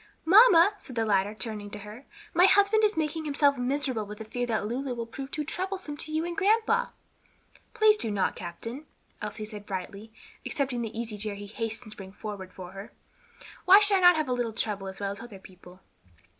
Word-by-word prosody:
"Mamma," 395 0 +7
said 255 - -12
the 225 -1 0
latter, 205 0 +1
turning 215 -2 -6
to 210 - -8
her, 210 +6 -11 0.3
"my 355 +2 +6
husband 405 +3 +4
is 425 -3 +2
making 315 0 -1
himself 285 -1 +2
miserable 260 -2 -1
with 210 0 -9
the 220 - -8
fear 245 +3 -3
that 220 -3 -1
Lulu 250 +3 -3
will 235 -1 -4
prove 270 +4 -8
too 300 - -3
troublesome 370 -1 -4
to 310 - -3
you 315 +2 -1
and 345 0 -4
grandpa." 445 +4 +2 0.9
"Please 430 0 +5
do 230 - -1
not, 205 -2 0
captain," 230 - -7 0.3
Elsie 215 - -5
said 210 -1 -10
brightly, 200 +3 -6 0.3
accepting 265 -4 -2
the 225 0 -5
easy 220 -3 -5
chair 210 0 -2
he 205 0 -8
hastened 225 +1 -5
to - - -12
bring 190 -1 -10
forward 200 -3 -7
for 185 -1 -10
her. 195 +3 -10 0.7
"Why 380 +2 +9
should 410 -1 +4
I - - 0
not 355 -1 +8
have 310 -2 -1
a 250 - 0
little 240 -2 -2
trouble 205 -3 -3
as 190 0 -8
well 200 -1 -2
as 200 - -8
other 230 -4 -10
people? 185 -1 -16
235 Hz, 210 wpm, -28 LUFS, 210-315 Hz, 0.9 s, Why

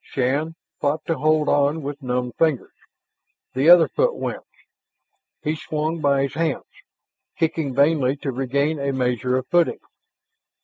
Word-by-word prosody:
Shann 140 +5 -1 0.2
fought 150 +2 -1
to 165 - 0
hold 155 0 +2
on 145 +2 +1
with 145 +1 -6
numbed 125 -1 -2
fingers. 155 -6 +1 0.8
The 135 +5 +3
other 175 -2 +8
foot - - 0
went. - - -4 1.0
He 155 0 -1
swung 155 +1 -3
by 140 -1 +2
his 140 - -3
hands, 160 -4 -2 0.7
kicking 160 -5 -1
vainly 140 -2 +3
to 140 -1 -4
regain 140 +4 -1
a 140 0 -1
measure 125 -1 0
of 130 - -3
footing. 175 -1 +2
145 Hz, 140 wpm, -22 LUFS, 135-160 Hz, 1.0 s, other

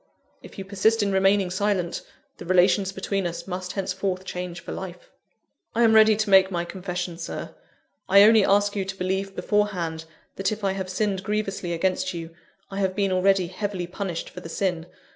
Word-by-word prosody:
If - - -13
you 195 - -6
persist 210 +3 +2
in 200 - 0
remaining 195 -1 +3
silent, 185 -2 -1 0.4
the - - -9
relations 185 +1 +3
between 195 -1 -2
us 170 - -6
must 185 -1 -5
henceforth 190 -1 -2
change 180 -2 -5
for - - -9
life." 180 -2 -8 0.6
"I 235 - +3
am 225 -1 +5
ready 220 0 +7
to 215 0 -1
make 190 0 +7
my 175 -2 -2
confession, 180 -2 -5
Sir. 170 - -6 0.6
I 200 +1 +8
only 220 0 +7
ask 205 +1 +3
you 200 - 0
to 195 0 -6
believe 190 +1 -2
beforehand, 180 -5 -1 0.3
that 195 +1 0
if 215 0 -5
I 195 - +2
have 190 -1 -4
sinned 195 0 -1
grievously 195 -3 -2
against 185 +1 -1
you, 165 -1 -6 0.4
I 195 - -4
have 190 -1 0
been 200 -2 +1
already 185 0 +3
heavily 185 0 -4
punished 180 -1 -5
for - - -8
the 170 - -9
sin. 175 -2 -2
190 Hz, 185 wpm, -25 LUFS, 180-200 Hz, 0.6 s, I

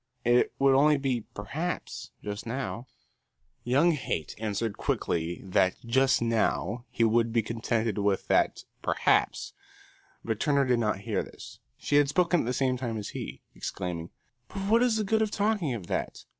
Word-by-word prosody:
It 120 +1 +4
would 135 0 +4
only 145 +2 +5
be 130 -5 -1
perhaps, 155 +13 -4
just 105 +2 -5
now." 125 0 -4 0.8
Young 140 +8 +4
Haight 130 - -3
answered 110 0 -2
quickly 85 +1 -1
that 95 -1 +2
"just 130 +1 +3
now" 115 0 0
he 115 - 0
would 115 +1 +3
be 115 -1 +2
contented 115 -1 -1
with 100 -1 0
that - - +2 0.2
"perhaps"; - - +1 0.7
but 110 -2 -2
Turner 140 -2 +2
did 125 -2 +2
not 105 -3 0
hear 110 0 -1
this. - - -11 0.2
She 145 - +1
had 145 -1 +4
spoken 175 +2 +3
at - - -1
the - - +1
same 130 0 +1
time 120 -3 -3
as 105 - -5
he, 65 +3 -7
exclaiming, 90 -3 -5 0.4
"But 195 0 -4
what 230 +1 +6
is 245 -3 +3
the 215 - +1
good 220 +2 +1
of 220 - +2
talking 205 - 0
of 100 -6 -7
that? - - -3
120 Hz, 170 wpm, -28 LUFS, 105-145 Hz, 0.8 s, what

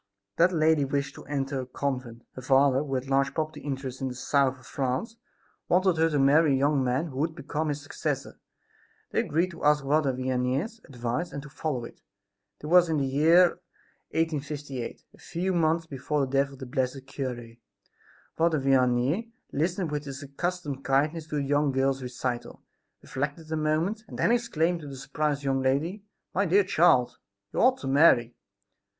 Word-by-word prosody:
That 175 +2 +5
lady 160 -3 +3
wished 140 0 -2
to - - -12
enter 140 -2 -2
a - - -6
convent. 125 -3 -4
Her 130 - -8
father, 135 0 +4
who 140 -2 -3
had 130 +1 -3
large 135 0 +1
property 155 0 -2
interests 135 -2 -5
in 135 - -1
the 125 - -5
South 135 +1 +1
of 130 - -18
France, 135 - -2 0.5
wanted 185 -1 +3
her 165 +1 +3
to 150 - 0
marry 145 +2 +5
a - - +3
young 140 0 +2
man 130 +6 0
who 130 -1 -6
would 160 +2 -1
become 155 0 -3
his 145 0 -3
successor. 145 - -4 0.7
They - - +1
agreed 170 +5 0
to 170 - -11
ask 150 -1 +4
Father 145 0 +2
Vianney's 130 - -2
advice 125 +6 -3
and 140 - -6
to 150 - -10
follow 135 -7 -3
it. - - -13 0.6
This 150 - -8
was 180 -1 +6
in 160 - +1
the 140 - +1
year 160 +7 +4 0.5
1858, 145 -5 -3
a - - -19
few 180 +2 -2
months 165 -1 +2
before 145 0 -2
the 135 -1 -2
death 140 0 +2
of - - -12
the 130 - -7
blessed 130 0 -2
cure. 125 -4 -5 0.9
Father 160 -2 +2
Vianney 135 - +2 0.2
listened 170 +3 -1
with 150 0 -3
his 140 0 -7
accustomed 145 -1 -4
kindness 150 +5 +1
to 150 - -5
the 145 - 0
young 145 +1 +2
girl's 135 0 +1
recital, 125 -1 -4 0.4
reflected 145 +4 -4
a - - 0
moment 160 +8 0
and - - -9
then - - +2
exclaimed 175 -8 +1
to 150 - -9
the 140 - -7
surprised 145 +1 -2
young 135 -1 +1
lady: 145 +10 0 0.3
"My 195 +2 +1
dear 200 +4 +5
child, 165 -9 +3 0.3
you - - -1
ought 255 +2 +5
to - - -5
marry!" 135 -4 +5
145 Hz, 180 wpm, -27 LUFS, 135-160 Hz, 0.9 s, was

